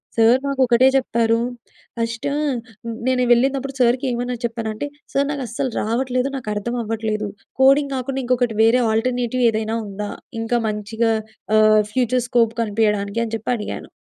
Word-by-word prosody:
Sir 230 +3 +5
మాకు 275 -1 -1
ఒకటే 240 +2 +5
చెప్పారు. 230 -3 +2 0.6
ఫస్ట్ 230 0 -3 0.8
నేను 255 -1 +2
వెళ్ళినప్పుడు 270 +3 +2
సార్‌కి 250 +2 +3
ఏమని 245 0 -2
చెప్పాను 230 -1 -3
అంటే 215 +7 -4 0.3
సార్ 280 +1 +2
నాకు 285 -2 -3
అస్సలు 235 +3 -3
రావట్లేదు, 250 +3 0
నాకు 255 -5 -5
అర్థం 235 +4 -3
అవ్వట్లేదు. 215 -1 -2 0.3
కోడింగ్ 275 +1 +5
కాకుండా 265 +1 -3
ఇంకొకటి 245 -3 0
వేరే 235 +3 +4
అల్ట్రర్నేటివ్ 245 +2 0
ఏదైనా 220 0 -2
ఉందా? 205 +1 -5 0.3
ఇంకా 235 +1 0
మంచిగా 220 +2 0 0.4
ఆహ్, 215 0 +6
ఫ్యూచర్ 250 -1 +1
స్కోప్ 230 -2 +2
కనిపియడానికని 215 +1 0
చెప్పి 220 +3 -3
అడిగాను. 210 -3 -6
235 Hz, 140 wpm, -21 LUFS, 220-255 Hz, 0.8 s, ఆహ్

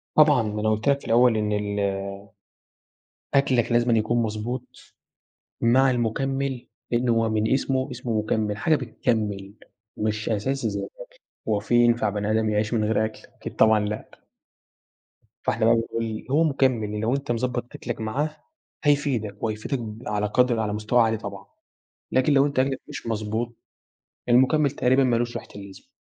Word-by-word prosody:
طبعًا 150 -4 +6
ما 105 0 -3
أنا 110 - +1
قُلت 110 +5 +1
لك 140 0 +3
في - - -16
الأول 120 0 +4
إن 105 -1 -1
ال 105 0 -2 1.5
أكلك 130 -4 +2
لازمًا 120 0 +3
يكون 120 +2 +1
مضبوط، 115 +3 -6 0.7
مع 130 +3 +4
المُكمل 130 +2 -1 0.2
لإنه 120 0 +2
هو 115 0 +2
من 110 0 +1
اسمه، 130 0 0
اسمه 120 -3 -2
مُكَمل، 105 -1 -1
حاجة 155 +7 +2
بتكمل، 105 -6 -2 0.4
مش 110 0 -2
أساسي 130 +6 -1
زي - - -3
الأكل، - - -8 0.5
هو 105 -2 +2
في 110 +3 -2
ينفع 120 -2 +4
بني 105 +1 -2
آدم 110 0 +1
يعيش 105 +2 0
من 110 -2 +1
غير 110 0 +1
أكل؟ 110 - -5 0.2
أكيد - - -8
طبعًا 110 -1 +5
لأ. 105 +1 -4 1.3
فإحنا 110 0 +1
بقى 115 +1 +5
بنقول 115 -1 -3
هو 155 +4 +4
مكمل 125 -8 +1
لو 115 +4 +1
أنت 140 -2 -3
مضبط 120 +1 -2
أكلك 120 -2 -5
معاه 145 +8 -2 0.5
هيفيدك، 135 -8 0
وهيفيدك 110 +5 -2 0.3
على 105 0 0
قدر 120 +2 +2
على 105 -2 -1
مستوى 110 +3 +2
عالي 110 -1 +2
طبعًا، 100 -2 -8 0.7
لكن 130 +3 +3
لو 140 0 +5
أنت 140 -2 -1
أكلك 135 0 0
مش - - -8
مضبوط، 110 +2 -2 0.7
المُكمل 135 +4 +4
تقريبًا 130 0 +2
ما 125 -2 +2
لوش 120 0 -2
ريحة - - -7
اللازمة، 100 - -11
115 Hz, 160 wpm, -24 LUFS, 110-130 Hz, 1.5 s, طبعًا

